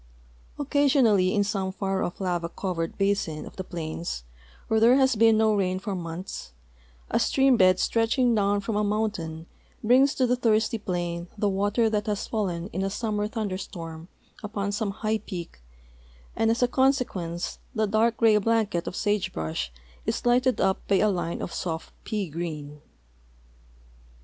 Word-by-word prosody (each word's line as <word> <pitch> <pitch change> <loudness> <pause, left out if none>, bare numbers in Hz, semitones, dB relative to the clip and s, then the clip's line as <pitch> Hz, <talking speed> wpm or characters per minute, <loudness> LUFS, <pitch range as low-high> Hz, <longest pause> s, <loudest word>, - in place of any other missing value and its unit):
Occasion 285 -2 +3
ally 200 -4 +4
in 205 +1 +2
some 195 -2 -2
far 195 0 -2
off 175 - -3
lava 175 -3 -1
covered 170 -3 -3
basin 195 -6 0
of - - -11
the 190 - -4
plains, 165 - -5 0.4
where 220 - +2
there 235 +3 +6
has 265 -2 +4
been 225 0 +5
no 220 0 +4
rain 185 -2 +1
for 200 +1 -4
months, 170 - -6 0.6
a - - +2
stream 270 -1 +4
bed 185 -3 +5
stretching 235 +2 +2
down 205 -1 +2
from 205 +2 -3
a 210 - +2
mountain 205 -7 -2 0.4
brings 260 +5 +5
to 260 - +2
the 250 0 +2
thirsty 225 -2 +1
plain 175 -3 -3
the 205 - +1
water 205 +4 +1
that 215 0 -1
has 205 -2 -1
fallen 180 -6 -2
in 190 - -3
a 195 - 0
summer 210 0 -1
thunder 210 -4 -3
storm 165 -3 -8 0.3
upon 205 -1 -3
some 205 0 -1
high 215 +2 -1
))cak, 175 - -8 0.7
and 225 - +2
as 230 +2 +2
a - - +5
con 265 +2 +4
sequence 180 -10 -4 0.2
the 220 -1 +2
dark 220 +3 +2
gray 225 -2 +5
blanket 210 -5 +1
of - - -4
sage 205 -2 0
brush 80 -5 -3 0.4
is - - -1
lighted 250 +1 +3
up 190 0 +2
b}' 195 -2 +3
a 215 - +4
line 175 -3 -2
of - - -5
soft 165 -3 -4
jjea 205 -7 -2
green. 150 -3 -5
205 Hz, 170 wpm, -26 LUFS, 175-225 Hz, 0.7 s, there